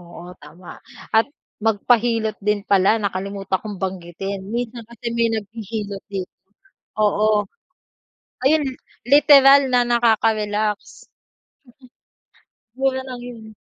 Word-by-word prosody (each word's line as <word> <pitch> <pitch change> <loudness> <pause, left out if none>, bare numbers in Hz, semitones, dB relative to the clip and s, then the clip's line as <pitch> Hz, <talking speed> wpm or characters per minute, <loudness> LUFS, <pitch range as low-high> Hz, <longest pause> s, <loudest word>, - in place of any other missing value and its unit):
Oo, 175 +1 -11
tama. 170 +4 -13 0.3
At 220 +1 +4 0.4
magpahilot 225 0 +1
din 210 0 -1
pala, 200 +2 +3
nakalimutan 195 -1 -3
kong 205 -3 -7
banggitin, 190 +1 -5
minsan 235 0 -4
kasi 235 0 -11
may 230 -1 +2
naghihilot 210 -2 -5
dito, 190 -2 -5 0.7
oo. 210 0 +2 1.0
Ayun, 305 +4 +4
li 260 - -5 0.3
literal 280 -1 +7
na 245 -1 +4
nakaka-relax. 215 -3 0
Mm. - - -55 1.5
Mura 265 -1 +1
lang 255 -2 -8
'yon. 230 -3 -10
215 Hz, 105 wpm, -21 LUFS, 200-235 Hz, 1.5 s, literal